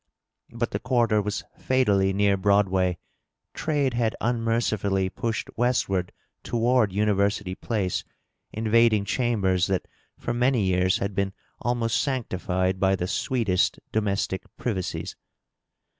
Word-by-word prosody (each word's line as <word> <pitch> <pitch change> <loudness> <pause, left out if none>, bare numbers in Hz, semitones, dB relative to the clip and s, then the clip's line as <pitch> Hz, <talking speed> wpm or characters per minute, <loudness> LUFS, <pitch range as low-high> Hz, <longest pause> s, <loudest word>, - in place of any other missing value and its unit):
But 115 0 -3
the - - -2
quarter 120 -4 +2
was 105 0 -3 0.2
fatally 100 -7 +2
near 100 0 +3
Broadway; 95 -2 +2 0.6
trade 145 -5 0
had 115 -2 0
unmercifully 110 -5 0
pushed 115 -2 -3
westward 105 -7 0 0.3
toward 120 -2 +2
University 100 -1 +1
Place, 95 -2 -2 0.5
in 110 +1 -4
vading 110 -2 +4
chambers 100 -7 +1
that 95 -1 -1 0.3
for 120 - -3
many 125 -1 +2
years 90 -1 +2
had 100 +1 -3
been 95 0 -1 0.3
almost 120 -1 0
sanctified 95 -8 -1
by 95 0 +3
the 90 -1 -3
sweetest 105 -3 0
domestic 100 -3 -1 0.2
privacies. 95 -7 -3
105 Hz, 115 wpm, -25 LUFS, 95-120 Hz, 0.6 s, vading